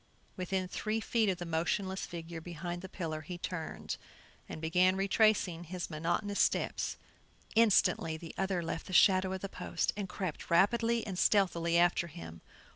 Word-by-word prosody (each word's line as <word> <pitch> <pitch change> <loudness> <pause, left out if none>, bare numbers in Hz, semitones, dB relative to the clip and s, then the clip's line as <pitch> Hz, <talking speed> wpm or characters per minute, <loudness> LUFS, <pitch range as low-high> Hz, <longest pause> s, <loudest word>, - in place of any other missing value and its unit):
Within 185 0 -2
three 215 +4 -2
feet 225 -1 +1
of 185 - 0
the 175 - -5
motionless 180 +4 -1
figure 165 -1 -7
behind 175 +1 -5
the 190 - -8
pillar 160 -5 -4
he 175 +4 -7
turned, 175 -2 -5 0.5
and - - -6
began 180 +4 +3
retracing 195 -3 +2
his 175 +1 -5
monotonous 175 +6 -1
steps. - - +1 0.6
Instantly 190 -7 +3
the 165 0 -9
other 190 -2 -1
left 165 0 -4
the 185 - -7
shadow 185 +1 +5
of 190 -1 -4
the 195 - -3
post - - -2
and 200 -2 -4
crept 180 -4 -5
rapidly 230 +6 +3
and 190 -3 -4
stealthily 170 -4 +3
after 175 0 +3
him. 145 - -10
180 Hz, 160 wpm, -32 LUFS, 170-195 Hz, 0.6 s, shadow